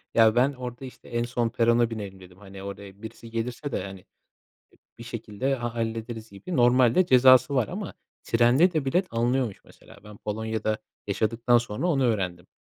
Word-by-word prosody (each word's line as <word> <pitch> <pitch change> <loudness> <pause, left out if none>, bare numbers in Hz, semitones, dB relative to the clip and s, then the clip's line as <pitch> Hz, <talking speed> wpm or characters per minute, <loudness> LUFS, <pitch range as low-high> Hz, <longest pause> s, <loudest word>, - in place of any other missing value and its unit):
Ya, 110 0 +5
ben 130 +4 +3
orada, 125 0 -7
işte, 130 - -13
"En 120 0 -1
son 120 -1 -1
perona 120 0 +2
binelim." 100 -4 -7
dedim. 90 0 -15
Hani, 95 -1 -11
oraya 100 0 -9
birisi 115 0 -9
gelirse 120 +5 -4
de, - - -2
hani, 95 -1 -8
eee, - - -29 0.7
bir 115 - -9
şekilde, 120 +3 -3
ha 120 -1 -5
hallederiz 115 0 -4
gibi. 125 - -7
Normalde 125 +7 +4
cezası 130 +1 +6
var 120 -5 +2
ama - - -6 0.3
trende 125 +10 +4
de 150 -4 0
bilet 180 +7 +1
alınıyormuş 120 -1 -1
mesela. - - -17
Ben 105 -1 -12
Polonya'da 110 0 -2 0.3
yaşadıktan 115 +4 +2
sonra 120 +7 -2
onu 140 -6 +2
öğrendim. 95 -5 -1
115 Hz, 170 wpm, -26 LUFS, 105-125 Hz, 0.7 s, cezası